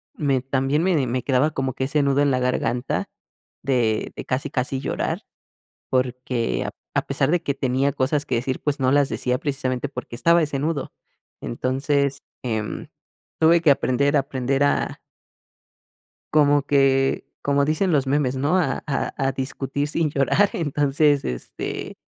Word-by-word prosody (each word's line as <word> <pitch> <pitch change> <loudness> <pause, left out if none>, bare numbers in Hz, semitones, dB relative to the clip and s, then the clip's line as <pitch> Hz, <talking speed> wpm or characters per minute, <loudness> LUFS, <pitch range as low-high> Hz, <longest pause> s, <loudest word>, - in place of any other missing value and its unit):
me 140 -4 +1
también 135 +3 0
me 185 -1 +2
de 135 -4 +1
me 125 +1 -2
quedaba 135 +3 +2
como 135 -3 -2
que 130 - -2
ese 145 +2 +1
nudo 140 0 +2
en 145 -1 +3
la 130 - +1
garganta 125 0 -1 0.5
de 120 -5 +1
de - - -7
casi 135 +3 -2
casi 130 0 -1
llorar, - - -2 0.7
porque 125 -2 -1
ap - - -7 0.2
a - - +2
pesar 140 0 0
de 175 0 +1
que 140 - -1
tenía 135 +1 0
cosas 140 +3 0
que - - 0
decir, 130 +2 -2
pues, 145 -1 0
no 130 0 +3
las 145 -1 +4
decía 125 0 -1
precisamente 135 -2 -2
porque 135 - -7
estaba 170 +5 +4
ese 145 -2 -2
nudo. 150 -1 -2 0.5
Entonces, 140 +3 -1 0.2
em, 110 -4 -3 0.5
tuve 165 +1 +5
que 155 - +5
aprender 140 +2 +1
aprender 135 -1 0
a 145 - 0 1.4
Como 145 -1 +5
que, 135 -1 +2
como 140 0 +2
dicen 155 +5 +1
los 140 -4 +2
memes, 135 -2 +1
¿no? 145 +7 +2
A 180 - 0
a 140 - -1
a 135 -1 +1
discutir 135 +2 -3
sin 160 0 0
llorar, 150 +9 +3
entonces 145 -1 +1
este 60 -1 -5
140 Hz, 160 wpm, -23 LUFS, 130-145 Hz, 1.4 s, tuve